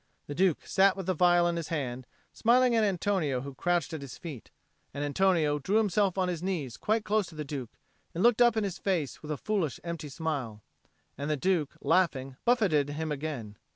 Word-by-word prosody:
The 145 - -6
Duke 180 0 +1
sat 195 0 +3
with 190 - -4
the 185 0 0
phial 175 +1 +4
in 170 0 -1
his 165 -2 -4
hand, 130 -5 -3 0.3
smiling 245 +1 +4
at 225 - +3
Antonio 180 -9 0
who 140 +1 -7
crouched 175 +3 0
at 160 - -4
his 140 -2 -8
feet. 150 -9 -8 0.5
And 145 - -2
Antonio 155 -2 +2
drew 190 +9 -1
himself 205 -3 +2
on 185 -1 +1
his 175 -3 -3
knees 170 -10 -3
quite 215 0 0
close 210 -2 +1
to 165 - -13
the 150 -1 -5
Duke, 135 -5 -6 0.4
and 175 - 0
looked 240 0 +4
up 240 -2 +5
in 220 - +2
his 195 -3 -4
face 175 -8 -1
with 150 - -9
a 150 - -2
foolish 185 - -1
empty 170 -3 -5
smile. 135 -9 -4 0.6
And 145 +2 -3
the 150 - +1
Duke, 170 -1 0
laughing, 135 -8 +1
buffeted 190 - +3
him 155 +1 -3
again. 135 -8 -5
165 Hz, 205 wpm, -29 LUFS, 145-195 Hz, 0.6 s, up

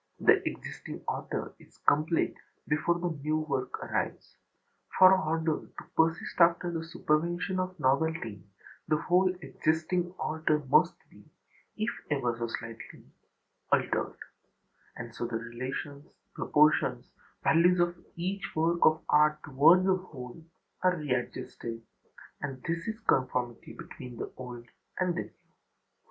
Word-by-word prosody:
The - - +5
existing - - -8
order - - -3
is - - -20
complete 155 +3 +3 0.3
before 155 +3 +2
the 175 0 -2
new 155 +2 +1
work 140 -4 -2
arrives; - - -3 0.6
for 185 0 +9
order 160 -3 +1
to - - -11
persist 165 +3 +1
after 170 +1 +4
the 165 - -2
supervention 170 +3 0
of 185 -1 -3
novelty, 135 - 0 0.4
the 155 - +3
whole 180 +3 +3
existing 170 +3 0
order 155 -1 +1
must - - +5 0.2
be, - - -17 0.5
if 215 +2 0 0.2
ever 125 -5 0
so 115 0 -3
slightly, 115 0 -8 0.7
altered; - - +1 0.8
and 115 -1 -7
so 120 - -3
the 115 - -2
relations, 130 +5 -6 0.3
proportions, 150 +1 +2 0.3
values 175 +2 +5
of 175 0 +2 0.2
each 190 +4 -4
work 165 +2 +2
of 155 0 +4
art 150 0 +4
toward 155 +6 +6
the 190 0 +3
whole 155 -5 -10 0.4
are 185 0 +3
readjusted; 125 -4 -3 0.6
and 135 -3 -5
this 165 +2 -2
is 220 -1 -3
conformity 125 - 0
between 125 -2 -10
the - - -5
old 125 -2 -8 0.3
and 180 -1 +2
the - - -1
new. - - -16
155 Hz, 130 wpm, -30 LUFS, 130-175 Hz, 0.8 s, for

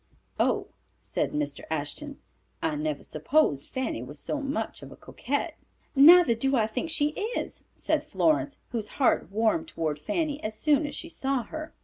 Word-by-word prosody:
"Oh," - - +1 0.3
said - - -2
Mr. 145 -1 -2
Ashton, 160 - -4 0.4
"I 160 - -1
never 150 -1 -2
supposed 155 - +1
Fanny 260 - -2
was 140 +4 -8
so 290 - -2
much 280 +2 -3
of - - -10
a - - -10
coquette." 285 +5 -3 0.4
"Neither 315 0 +8
do 270 +4 +1
I 225 -4 +3
think 250 +9 -3
she 295 -2 +2 0.3
is," - - -5
said 310 -2 0
Florence, 305 -1 +1
whose 225 -3 -2
heart 265 -7 +2
warmed 230 +10 +1
toward 155 - -2
Fanny 300 - -2
as 215 0 -3
soon 295 +4 +3
as - - -6
she 335 - -6
saw 270 -6 -1
her. 315 +6 -7
270 Hz, 165 wpm, -27 LUFS, -, 0.4 s, Neither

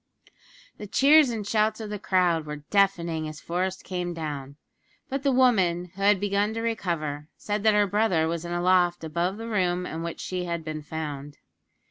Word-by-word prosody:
The 210 - -7
cheers 290 +5 +5
and 220 -3 -3
shouts 215 +1 +1
of 215 -2 -6
the 210 - -4
crowd 175 -5 +1
were 150 -1 -6
deafening 170 -6 +1
as 155 0 -8
Forest 185 +2 -3
came 180 -2 -4
down; 145 -4 -5 0.5
but 275 0 -2
the 275 0 +2
woman, 185 -9 +2
who 195 - -10
had 200 0 +4
begun 205 +2 0
to 225 - -2
recover, 165 -10 -2
said 210 0 -2
that 215 0 +4
her 205 0 +4
brother 195 -5 +1
was 165 0 -3
in 170 - -6
a 175 0 -1
loft 175 -2 +3
above 170 +5 -1
the 225 +1 -6
room 180 -4 0
in 160 -1 -5
which 170 0 -5
she 180 -1 -3
had 170 -1 -3
been 155 -1 -4
found. 145 -2 -6
180 Hz, 190 wpm, -26 LUFS, 165-210 Hz, 0.5 s, cheers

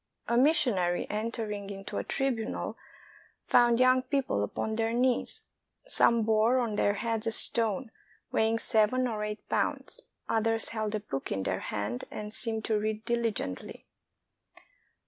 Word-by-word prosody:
A 235 - +1
missionary 245 - +3
entering 210 -2 -3
into 195 -1 -5
a - - -3
tribunal 250 -5 -2 0.7
found 240 -1 +4
young 255 0 +5
people 260 - -1
upon 220 - -3
their 225 0 0
knees. 250 +1 0 0.4
Some 235 - +4
bore 220 +3 +3
on 235 -4 0
their 205 0 +2
heads 225 +1 -2
a - - +1
stone 225 +1 +3 0.4
weighing 225 +1 +2
seven 230 +2 +2
or 215 -3 -3
eight 210 0 -5
pounds; - - -1 0.3
others 225 0 +1
held 215 -1 -2
a - - -1
book 135 -9 -5
in 95 - -1
their 95 0 -1
hand 105 +4 -4
and 210 0 -7
seemed 220 -2 -3
to 215 -2 +1
read 215 +1 -3
diligently. 230 - -3
225 Hz, 145 wpm, -29 LUFS, 210-235 Hz, 0.7 s, young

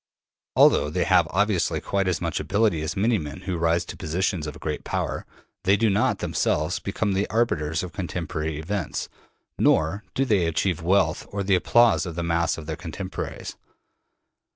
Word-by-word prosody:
Although 75 - +5
they 90 +4 0
have 90 -4 +4
obviously 100 -1 +1
quite 100 -1 -1
as 90 -4 0
much - - -2
ability 100 -5 +1
as 80 +5 -3
many 110 +2 +2
men 75 -1 -7
who 95 -2 -3
rise 85 0 +1
to - - -7
positions 85 0 -1
of 75 - -7
great - - -4
power, - - -3 0.4
they 95 +2 +4
do 110 -1 +2
not 100 +3 +2
themselves 80 +4 0
become 100 +1 -1
the 95 +2 0
arbiters 80 -9 0
of 90 - -7
contemporary 80 -4 -3
events, 85 +1 -3 0.5
nor 80 +7 +2
do 135 - +2
they 100 -9 +2
achieve 85 +1 0
wealth 95 +3 +1
or 100 -1 -3
the 95 0 +1
applause 115 +3 +4
of 85 - -6
the 85 - -2
mass 85 0 +1
of 80 - -8
their 80 +1 -3
contemporaries. 90 +3 -6
90 Hz, 175 wpm, -25 LUFS, 80-100 Hz, 0.5 s, Although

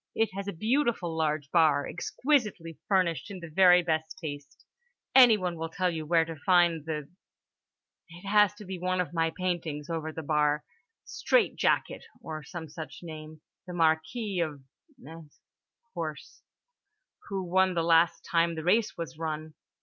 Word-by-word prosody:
It 225 -3 +1
has 195 +1 -5
a - - -1
beautiful 220 - 0
large 155 -2 -1
bar, 155 -4 +4
exquisitely 210 - -1
furnished 185 -2 +1
in 195 -2 -7
the 170 -2 -10
very 180 +1 +6
best 160 -1 -2
taste. 145 -3 -8 0.5
Anyone 215 -9 +6
will 165 0 -4
tell 180 +2 0
you 160 -2 -5
where 165 0 +3
to 165 0 -7
find 170 -1 +3
the 150 -3 -4 0.5
——. - - -49
It 175 +3 -13
has 210 0 +4
one 185 -2 -3
of 175 -4 -2
my 165 -1 +1
paintings 170 -4 -3
over 160 -1 -3
the 160 0 -7
bar: 150 0 +1 0.4
"Straight 410 +4 +1
jacket" - - 0 0.2
(or 155 -1 -7
some 170 +1 -8
such 155 -1 -9
name) 155 -1 -9 0.3
"the 180 - -6
Marquis 175 +5 0
of 150 -5 -3 0.4
——'s 165 - -13 0.5
horse, 155 -6 -6 0.9
who 195 -2 -2
won 185 +1 +2
last 165 0 +3
time 170 0 +1
the 160 - -5
race 215 +6 +2
was 165 -2 -6
run. 155 -1 -4
165 Hz, 150 wpm, -28 LUFS, 155-185 Hz, 0.9 s, very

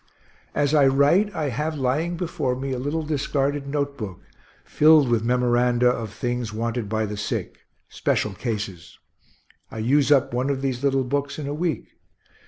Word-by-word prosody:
As 145 0 +1
I 145 -3 +5
write, 145 +10 +3
I 150 -2 -1
have 150 +5 -2
lying 150 +7 0
before 155 -7 -2
me 135 +1 -4
a 130 - -2
little 145 +5 -2
discarded 145 -1 -1
note 140 0 -2
book, 95 -6 -6 0.5
filled 155 -2 +5
with 115 -2 +1
memoranda 125 0 +2
of 115 -4 -2
things 120 0 -3
wanted 115 0 -3
by 110 0 0
the 105 0 -5
sick 100 - -4 0.3
special 105 - -1
cases. 100 -5 -5 0.7
I - - -9
use 135 +6 +2
up 135 -4 +4
one 125 +3 0
of 135 -1 -2
these 130 -1 -2
little 135 -1 +2
books 140 +2 -2
in 150 - -5
a 145 - -3
week. 155 -4 -2
135 Hz, 170 wpm, -24 LUFS, 120-145 Hz, 0.7 s, I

